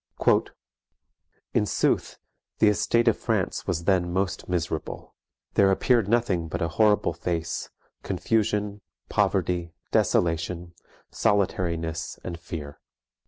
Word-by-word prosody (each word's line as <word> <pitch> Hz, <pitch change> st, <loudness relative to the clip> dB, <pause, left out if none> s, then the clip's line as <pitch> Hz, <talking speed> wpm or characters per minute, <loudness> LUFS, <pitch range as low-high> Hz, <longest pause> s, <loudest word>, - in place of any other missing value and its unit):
"In -, -, +2 dB
sooth, -, -, 0 dB, 0.4 s
the 105 Hz, -, +5 dB
estate 115 Hz, +3 st, +2 dB
of 115 Hz, -, +3 dB
France 110 Hz, -5 st, -1 dB
was 85 Hz, -3 st, -1 dB
then 90 Hz, -1 st, +2 dB
most 95 Hz, 0 st, -2 dB
miserable. 85 Hz, -3 st, -3 dB, 0.4 s
There 100 Hz, -1 st, +5 dB
appeared 115 Hz, +2 st, +3 dB
nothing 105 Hz, -7 st, +1 dB
but 85 Hz, +2 st, -3 dB
a 85 Hz, -2 st, 0 dB
horrible 105 Hz, +4 st, +3 dB
face, 85 Hz, -2 st, -3 dB, 0.3 s
confusion, 105 Hz, -2 st, 0 dB, 0.3 s
poverty, 85 Hz, -2 st, 0 dB, 0.2 s
desolation, 85 Hz, +1 st, +1 dB, 0.4 s
solitarinesse, 85 Hz, -5 st, 0 dB
and 85 Hz, -2 st, -5 dB
feare. 75 Hz, -4 st, -7 dB
90 Hz, 105 wpm, -26 LUFS, 85-105 Hz, 0.4 s, the